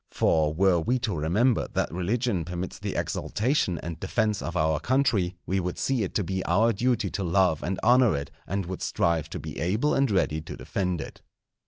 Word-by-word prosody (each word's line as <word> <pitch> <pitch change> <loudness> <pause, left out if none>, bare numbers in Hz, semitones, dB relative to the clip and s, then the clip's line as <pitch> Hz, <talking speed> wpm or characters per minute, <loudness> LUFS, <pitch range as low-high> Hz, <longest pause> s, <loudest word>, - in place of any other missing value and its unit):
For 75 -2 +2
were 90 +2 +3
we 120 +10 +1
to 110 -6 -2
remember 105 - +2
that - - 0
religion 100 +2 0
permits 90 +2 -5
the - - -4
exaltation 110 - 0
and 85 -1 -5
defence 105 +2 0
of 85 +1 -4
our 80 -1 +2
country, 120 -9 +1
we 95 +1 0
would 90 -1 -3
see 130 -3 0
it 95 - -3
to 105 - +1
be 95 +1 -2
our 110 +7 +3
duty 115 -2 0
to 100 - -3
love 90 -3 +2
and 95 +1 -2
honour 120 - +5
it, 70 0 -6 0.2
and 100 -1 -2
would 90 +1 -6
strive 80 -3 0
to - - -5
be - - -7
able 105 - +1
and 135 -1 +2
ready 80 -6 +1
to - - -8
defend 90 -5 -2
it. - - -9
95 Hz, 200 wpm, -26 LUFS, 85-115 Hz, 0.2 s, honour